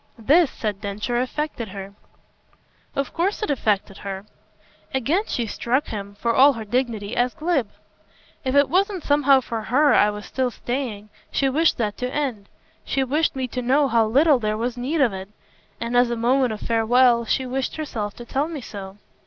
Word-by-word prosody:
This," 290 +8 +4
said 210 -5 -4
Densher, 215 +4 -2
"affected 255 -2 -3
her." 195 0 -8 1.0
"Of 275 - -2
course 390 +6 -1
it 365 - 0
affected 210 -7 0
her." 195 0 -6 0.7
Again 305 - +1
she 240 - -1
struck 245 +6 -1
him, 200 -2 -6
for 230 +3 0
all 275 +4 +6
her 225 -3 -6
dignity, 230 -2 -2
as 245 0 +1
glib. 310 -8 0 0.7
"If 260 0 -1
it 285 -1 +5
was 390 +4 +2
somehow 285 -2 +4
for 230 -2 -4
HER 285 +7 +3
I 210 - +5
was 210 0 -6
still 260 -1 -1
staying, 240 -4 -4 0.2
she 270 - +1
wished 315 +5 +2
that 210 -3 -2
to 250 0 -3
end, 255 -9 -3 0.3
she 270 - 0
wished 295 +4 0
me 260 -1 -2
to 250 - -3
know 275 +4 +3
how 230 -3 +3
little 280 +4 +4
there 215 -1 -1
was 240 +2 -2
need 275 +6 -1
of 240 -7 +3
it. 190 +1 -7 0.5
And 235 +1 -3
as 245 0 +4
a 240 - -1
manner 250 +2 +2
of 215 - -6
farewell 235 +1 +3
she 260 +3 0
wished 260 +1 -2
herself 225 -10 -4
to 240 - -10
tell 275 +5 -1
me 320 -4 -6
so." 195 -3 -8
245 Hz, 185 wpm, -23 LUFS, 215-275 Hz, 1.0 s, all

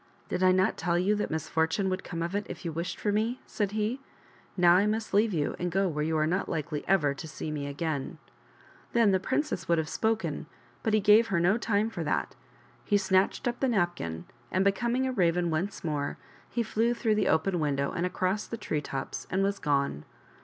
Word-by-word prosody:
" - - -32
Did 180 - -2
I 185 0 +6
not 185 +1 +2
tell 170 +1 0
you 190 +4 +2
that 210 0 -1
misfortune 160 +4 0
would 185 +1 -2
come 165 -1 -4
of 170 +2 -3
it 205 0 -2
if - - -8
you 165 - -1
wished 170 +3 -4
for 210 - 0
me 225 +4 0
?" - - -31
said 205 -2 -2
he. 220 +4 -1 0.3
" - - -29
Now, 175 -1 +6
I 200 +3 +3
must 215 0 -2
leave 210 +2 +4
you 150 -5 -1
and 175 0 -1
go 195 +2 +2
where 150 -3 -1
you 160 +1 0
are 155 - +2
not 180 +5 -1
likely 155 -1 -3
ever 155 -7 +3
to 160 +3 -8
see 155 0 -5
me 145 -2 -3
again." 145 0 -3 0.8
Then 230 -4 +5
the 190 - +3
princess 260 - -1
would 170 0 +3
have 160 -1 0
spoken, 190 -8 -1 0.3
but 220 -1 +1
he - - +4
gave 210 +3 +6
her 195 -6 +1
no 180 +5 +4
time 220 -1 0
for - - -4
that. - - -1 0.5
He 205 - +3
snatched 190 +5 +1
up 240 0 -2
the 265 - +1
napkin, 175 - -1 0.3
and, 185 +1 +2
becoming 240 +6 +1
a 260 - 0
Raven 175 -5 +2
once 185 +6 -2
more, 150 -3 -2 0.3
he 235 - -1
flew 230 +2 +1
through 230 -2 +1
the 210 -2 +1
open 175 +3 +2
window 140 -2 0
and 170 - -2
across 185 +2 -1
the 230 - -5
tree 155 -8 -2
tops 135 -2 -5
and 190 +1 +1
was 200 0 0
gone. 140 - 0
185 Hz, 225 wpm, -29 LUFS, 160-210 Hz, 0.8 s, I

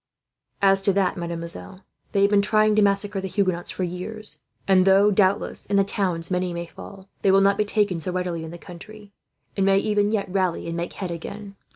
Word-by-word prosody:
"As 195 0 +4
to 195 0 +2
that, 190 -2 +1
mademoiselle, 170 - -5 0.3
they 200 - +1
have 200 +1 +4
been 205 -1 +5
trying 215 +1 +3
to 215 - +4
massacre 200 0 +1
the 190 - -4
Huguenots 185 -3 -1
for 185 - -3
years; 195 +5 -6 0.3
and 190 -1 +5
though, 195 +2 +5
doubtless, 200 0 +1
in 200 - 0
the 200 - +5
towns 185 -4 -2
many 180 -1 -1
may 170 0 -4
fall, 190 +3 -12
they 195 - +2
will 195 +1 +6
not 195 0 +4
be 210 +1 0
taken 205 -4 0
so 180 +3 -3
readily 180 -2 -3
in 160 - -7
the 170 - -9
country; 200 +4 -12 0.4
and 195 - 0
may, 195 0 +4
even 205 0 +1
yet, 215 -3 -1
rally 185 -2 -1
and 165 - -4
make 170 0 -4
head 185 -3 -5
again. 200 +4 -8
195 Hz, 215 wpm, -23 LUFS, 180-205 Hz, 0.4 s, will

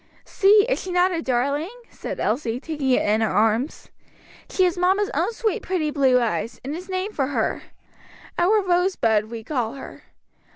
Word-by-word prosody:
"See, 405 +1 +4
is - - 0
she 370 - -6
not 360 +1 +3
a 335 -2 -2
darling?" 280 +5 -1 0.2
said - - -7
Elsie, 235 0 -1
taking 295 -2 -3
it 255 - +2
in 215 +2 +2
her 220 - +1
arms. 225 +6 0 0.6
"She 375 - +1
has 360 -2 +2
mamma's 380 +3 +1
own 340 +9 0
sweet 445 -2 -2
pretty 330 -5 -1
blue 265 -3 +3
eyes, 230 -1 -2
and 285 +3 -3
is 365 +3 -9
named 375 +3 -3
for 270 -3 0
her. 285 - -1 0.8
Our 405 +4 +3
Rosebud 350 - +1
we 230 -1 -7
call 245 -4 -2
her. 275 - -11
305 Hz, 175 wpm, -23 LUFS, 245-370 Hz, 0.8 s, See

